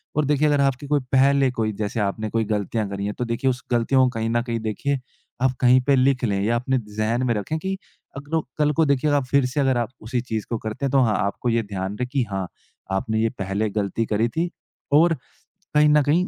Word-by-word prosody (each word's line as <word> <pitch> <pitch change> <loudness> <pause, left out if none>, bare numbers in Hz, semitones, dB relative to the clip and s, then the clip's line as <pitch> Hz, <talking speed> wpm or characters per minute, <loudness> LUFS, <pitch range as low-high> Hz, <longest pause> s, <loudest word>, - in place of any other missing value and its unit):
और 150 0 +2
देखिए 150 +1 +2
अगर 145 -1 +3
आपकी 140 +1 0
कोई 145 0 +2
पहले 135 0 +4
कोई 110 -3 -1
जैसे 105 +2 -3
आपने 105 +1 -1
कोई 115 +1 0
गलतियाँ 105 +1 -1
करी 100 0 -4
हैं। 105 - -2
तो 125 - -1
देखिए 115 +3 0
उस 125 -1 -3
गलतियों 125 +2 +3
को 130 - +3
कहीं 115 0 -1
न 120 +1 +1
कहीं 120 -2 -2
देखिए 120 +6 -2 0.4
आप 130 0 +3
कहीं 125 0 +6
पे 140 +2 +3
लिख 130 0 +2
लें 100 -4 +1
या 115 +3 +1
अपने 130 +2 0 0.2
ज़हन 115 +3 +1
में 120 - +2
रखें 105 +10 -2
कि 190 +3 -3 0.4
अग 140 +1 -8
लो 160 - +3 0.2
कल 150 -1 +3
को 160 - +5
देखिए 140 +1 +2
जब 145 - +3
आप 140 - +2
फ़िर 140 +1 +2
से 130 +4 -2
अगर 135 -2 +2
आप 120 -2 -1
उसी 120 +3 -2
चीज़ 110 -3 -4
को 115 - -1
करते 110 +5 -4
हैं। 135 - -1
तो 135 - +4
हाँ, 110 -4 +2
आपको 100 +4 -1
ये 115 0 +1
ध्यान 100 -1 -4
रहे 125 - -1
कि 130 +1 0
हाँ, 95 -2 -2 0.4
आपने 110 +3 0
ये 115 0 +2
पहले 100 +3 -1
गलती 105 +2 -1
करी 110 +2 +1
थी 165 +8 -1 0.4
और 165 +3 +6 0.6
कहीं 150 0 +5
न 150 0 +5
कहीं 165 +6 +2
125 Hz, 245 wpm, -23 LUFS, 110-140 Hz, 0.6 s, कहीं